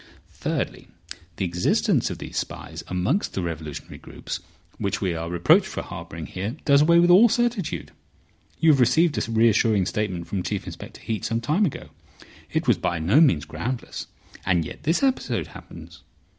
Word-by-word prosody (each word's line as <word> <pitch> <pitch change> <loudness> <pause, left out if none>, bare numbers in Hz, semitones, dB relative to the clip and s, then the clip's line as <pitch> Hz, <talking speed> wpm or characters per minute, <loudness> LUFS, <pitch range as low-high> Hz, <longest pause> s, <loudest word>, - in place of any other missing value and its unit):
Thirdly, - - -3 0.5
the 95 - -1
existence 90 0 +1
of - - -5
these - - -8
spies - - -5
amongst 95 - 0
the 95 - -1
revolutionary 80 -3 -6
groups, - - -7 0.4
which 100 - -1
we 95 -3 0
are 85 0 -4
reproached 85 0 +4
for - - -5
harbouring 80 0 -7
here, 100 +7 -4
does 140 0 +5
away 170 +3 +5
with 175 +1 +5
all 215 +7 +8
certitude. 235 -5 -1 0.7
You 160 0 +6
have 140 - +3
received 145 +6 +4
a 115 - -3
reassuring 110 -3 +3
statement 95 -4 -2
from 95 0 -3
Chief 100 +2 -3
Inspector - - -9
Heat 110 -4 -3
some 115 0 0
time 155 - +2
ago. 145 - -7 0.6
It - - -1
was - - +4
by 85 - -1
no 90 - +4
means 85 - +4
groundless—and 95 -7 -4
yet - - -9
this 165 - +1
episode 265 -1 0
happens. - - -12
110 Hz, 165 wpm, -24 LUFS, -, 0.7 s, all